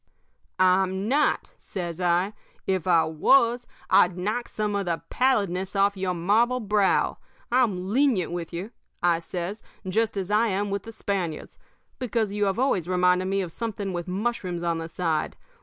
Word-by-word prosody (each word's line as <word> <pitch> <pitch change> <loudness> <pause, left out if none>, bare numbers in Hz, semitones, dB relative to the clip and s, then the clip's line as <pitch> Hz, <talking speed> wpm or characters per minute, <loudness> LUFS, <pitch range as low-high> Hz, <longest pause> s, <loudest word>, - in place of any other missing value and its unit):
"'I'm 190 +1 +2
not,' 285 +5 +1
says 175 -2 -5
I. 180 +3 +2 0.3
'If 185 -2 -1
I 170 -2 +5
was, 235 - +3 0.2
I'd 180 0 +5
knock 215 +6 -2
some 210 -1 -2
of 200 -2 -1
the 170 -1 -2
pallidness 200 -8 +1
off 200 +1 +3
of 190 - -9
your 180 -1 0
marble 220 +9 +2
brow. 210 -3 +1 0.3
I'm 205 -8 +1
lenient 250 -10 +2
with 175 -2 -4
you,' 180 +6 -5 0.3
I 170 -1 +3
says, 180 +4 -5 0.3
'just 220 +3 0
as 195 0 -3
I 215 +2 +3
am 200 0 -1
with 200 0 -1
the 225 - -9
Spaniards, 190 -7 -4 0.4
because 230 -5 -1
you 205 0 +1
have 195 +1 0
always 240 -10 +1
reminded 180 0 +3
me 195 +1 0
of 175 -3 -5
something 205 -2 -4
with 175 0 -4
mushrooms 185 -3 -2
on 170 -1 0
the 165 0 -6
side. 160 -2 -1
190 Hz, 170 wpm, -26 LUFS, 180-215 Hz, 0.4 s, I